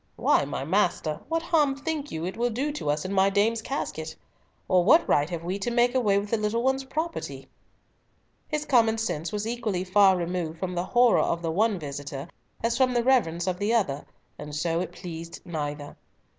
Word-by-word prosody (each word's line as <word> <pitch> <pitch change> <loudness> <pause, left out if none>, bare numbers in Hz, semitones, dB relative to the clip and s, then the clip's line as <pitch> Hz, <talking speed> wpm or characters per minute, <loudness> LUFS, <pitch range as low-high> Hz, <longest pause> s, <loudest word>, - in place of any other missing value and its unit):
Why, - - +3
my 135 -1 -4
master, 170 -3 0
what 330 0 0
harm 300 -5 +2
think 295 +1 -4
you 160 +1 -3
it 185 - -4
will 240 +1 0
do 265 +6 -2
to 290 - -4
us 150 +2 0
in 190 - -3
my 195 0 +4
dame's 215 +3 +1
casket? 160 - -4 0.5
Or 185 -2 +4
what 320 - +5
right 145 +2 +2
have 170 -2 -5
we 185 +3 -3
to 220 - -2
make 240 +1 +3
away 215 -6 +3
with 205 +1 -3
the 230 - +2
little 215 +2 -1
one's 265 +1 +1
property?" 315 +5 -4 1.0
His 300 -1 -2
common 230 -5 +3
sense 200 -7 -2
was 210 0 -3
equally 225 -6 -2
far 190 0 +5
removed 170 -2 -3
from 180 +1 -3
the 175 0 -2
horror 240 +2 +4
of 170 0 -1
the 165 - -1
one 210 +4 +2
visitor 140 -2 -6 0.4
as 230 0 +1
from 255 -2 +2
the 240 - +2
reverence 175 -10 +2
of 185 -1 -2
the 210 +3 +1
other, 145 -11 0 0.4
and 150 0 -7
so 165 +2 0
it 175 -1 -3
pleased 170 -2 -8
neither. 145 -3 -5
195 Hz, 200 wpm, -26 LUFS, 165-240 Hz, 1.0 s, what